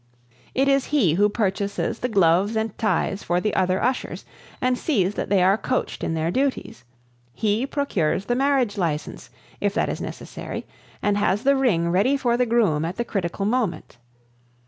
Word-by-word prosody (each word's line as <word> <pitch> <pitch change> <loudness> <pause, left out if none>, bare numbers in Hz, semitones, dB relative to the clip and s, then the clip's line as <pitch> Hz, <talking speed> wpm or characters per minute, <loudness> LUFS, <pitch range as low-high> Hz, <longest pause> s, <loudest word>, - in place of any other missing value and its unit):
It 270 +1 +2
is 275 -1 +3
he 255 - +2
who 205 +5 +3
purchases 200 -2 -1
the 250 - -2
gloves 195 +1 +3
and 220 -1 -1
ties 210 -2 0
for 175 0 0
the 210 +3 -1
other 185 0 +1
ushers 255 +1 -2 0.3
and 255 0 +1
sees 205 - 0
that - - -4
they 195 -3 +3
are 195 +3 +4
coached 255 - -2
in 165 - -1
their 160 +1 0
duties; 265 - -2 0.5
he 220 +4 0
procures 195 - -1
the 240 - 0
marriage 255 -5 +1
license, 160 -4 -3 0.3
if - - -1
that - - +1
is - - -4
necessary, - - -6 0.4
and 205 0 +2
has 205 +2 +1
the 275 +1 +4
ring 200 -11 +2
ready 215 +10 +3
for 245 -3 +1
the 250 0 +1
groom 210 -10 +2
at 170 +3 -3
the 235 - -2
critical 195 -1 -2
moment. 215 - -1
205 Hz, 175 wpm, -23 LUFS, 185-250 Hz, 0.5 s, are